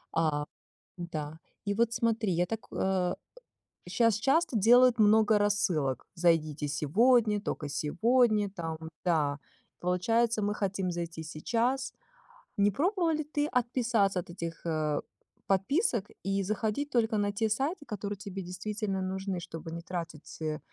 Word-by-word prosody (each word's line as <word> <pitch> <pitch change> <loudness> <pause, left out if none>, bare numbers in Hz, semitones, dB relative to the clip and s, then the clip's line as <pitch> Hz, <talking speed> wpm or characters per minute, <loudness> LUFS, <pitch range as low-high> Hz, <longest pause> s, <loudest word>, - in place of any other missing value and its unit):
А, 155 -3 +1 0.5
да. 160 -3 -5 0.3
И 200 - 0
вот 230 +1 +2
смотри, 225 -4 +1
я 175 +1 +2
так, 225 +3 -3
а, 190 -2 0 0.7
щас 230 +3 +3
часто 275 +4 +2
делают 245 +3 +6
много 215 0 +5
рассылок. 175 - 0
"Зайдите 165 -4 +1
сегодня, 210 - +3
только 155 -7 -4
сегодня", 210 - +2
там 165 -4 -5 0.3
да, 150 -5 +1 0.4
получается 220 +6 +1
мы 205 +1 0
хотим 195 -2 -1
зайти 170 -2 -4
сейчас. 230 +12 -1 0.7
Не 205 0 +4
пробовала 340 - +1
ли 310 0 -1
ты 295 0 -1
отписаться 235 -6 +1
от 175 - -7
этих, 170 -1 -6
э, 155 -3 0 0.5
подписок 205 - +1
и 195 0 0
заходить 215 +7 -1
только 225 -4 +1
на 205 0 +1
те 220 +2 0
сайты, 285 - -1
которые 205 -2 -4
тебе 195 -1 -6
действительно 195 +2 -3
нужны, 190 0 -3
чтобы 165 -1 -8
не 170 +1 -5
тратить, 165 -3 -7
э, 155 -1 -2
200 Hz, 135 wpm, -30 LUFS, 170-230 Hz, 0.7 s, делают